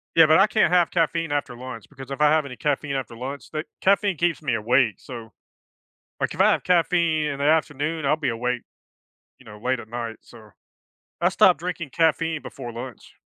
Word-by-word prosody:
Yeah, 165 - +8
but 155 +2 +5
I 195 - +6
can't 215 -4 +2
have 175 -2 +4
caffeine 165 -1 0
after 145 -4 -2
lunch 125 -2 -8
because 135 -1 -11
if 135 - -5
I 150 0 +5
have 155 -1 +2
any 125 -3 -8
caffeine 145 -1 -1
after 125 -3 -4
lunch, 135 +4 -7
the 155 - -3 0.2
caffeine 200 -1 +2
keeps 170 0 0
me 130 -6 0
awake. 115 0 +2
So, 115 -3 -10 0.9
like, - - -1
if - - 0
I - - +6
have - - 0
caffeine 170 -3 +2
in 140 -2 -3
the 140 - -2
afternoon, 155 0 0
I'll 150 - +3
be 155 -1 -2
awake, 125 +1 -2 0.8
you - - -19
know, 105 - -11
late 125 +4 -1
at 110 - -10
night. 115 -1 -5
So 110 -2 -16 0.7
I've - - +3
stop - - +5
drinking 170 -4 -5
caffeine 160 0 +1
before 120 -3 -8
lunch. 125 +2 -9
145 Hz, 205 wpm, -24 LUFS, 125-160 Hz, 0.9 s, Yeah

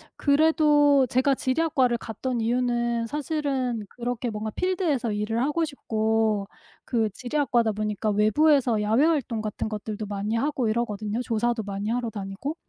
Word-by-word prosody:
그래도 290 -2 +4
제가 260 +2 +2
지리학과를 260 -3 +1
갔던 235 +3 -4
이유는 240 0 0
사실은 270 -5 -2
그렇게 245 0 -3
뭔가 215 0 -4
필드에서 330 - 0
일을 210 +3 -1
하고 300 +4 +1
싶고 220 -6 0 0.4
그 225 -3 0
지리학과다 245 0 0
보니까 210 0 -2
외부에서 235 +3 +3
야외 220 +8 +3
활동 270 -9 0
같은 215 0 -3
것들도 215 0 -5
많이 205 +2 -3
하고 265 -2 0
이러거든요 215 -1 -2
조사도 235 0 0
많이 200 +1 -4
하러 240 0 -1
다니고. 205 +8 -5
235 Hz, 350 characters per minute, -25 LUFS, 215-275 Hz, 0.4 s, 그래도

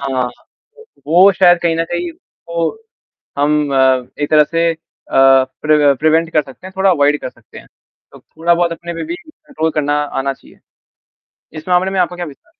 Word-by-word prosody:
हाँ। 130 -2 -2 0.8
वो 180 +5 +6
शायद 175 -1 +4
कहीं 165 -1 +1
न 165 - 0
कहीं 175 0 -3 0.4
वो 170 -1 -1 0.7
हम 150 0 +1
अ, 130 -2 +3 0.2
एक 145 - -2
तरह 150 -1 +5
से 165 +2 0
अ, - - -8 0.9
प्रव 150 -2 +3
प्रिवेंट 160 +2 +2
कर 155 - +2
सकते 135 +7 -14
हैं, 190 - -10
थोड़ा 190 0 +3
अवॉयड 145 -3 +2
कर - - -6
सकते 120 -3 -16
हैं, - - -15 0.5
तो - - -14
थोड़ा-बहुत 170 +1 0
अपने 170 +1 -7
पे 165 - -5
भी 335 +2 -5
कंट्रोल 300 - -5
करना 145 -1 -1 0.3
आना 135 +1 -1
चाहिए। - - -19 1.0
इस 155 - -11
मामले 180 +1 +2
में 190 -1 -1
आपका 180 0 -1
क्या 175 - -4
विचार? 145 -3 -13
165 Hz, 180 wpm, -16 LUFS, 145-175 Hz, 1.0 s, वो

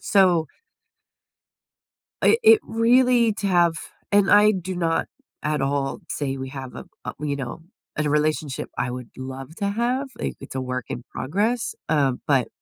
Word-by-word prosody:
So 180 -5 +3 1.8
it 455 - +5
it 440 0 +8
really 235 0 +3
to 205 - -3
have 175 -3 +4 0.4
and 200 -1 +4
I 210 +1 +7
do 185 -2 -4
not 165 -2 0 0.3
at 150 -2 -1
all 135 0 -1
say 135 -2 -2
we 130 0 -5
have 135 -2 -8
a - - -8 0.2
a, - - -4
you 145 -1 -2
know, 135 +2 -6 0.3
and 155 - -1
a - - +1
relationship 150 -2 0
I 125 - -1
would 125 -1 -7
love 130 +3 -7
to 200 -2 -1
have, 245 +6 0
like, - - -3
it's - - -10
a 130 - -1
work 125 -1 -3
in 120 - -5
progress, 215 - -1
um, 140 -5 +2
but 135 -5 +3
155 Hz, 165 wpm, -23 LUFS, 135-205 Hz, 1.8 s, it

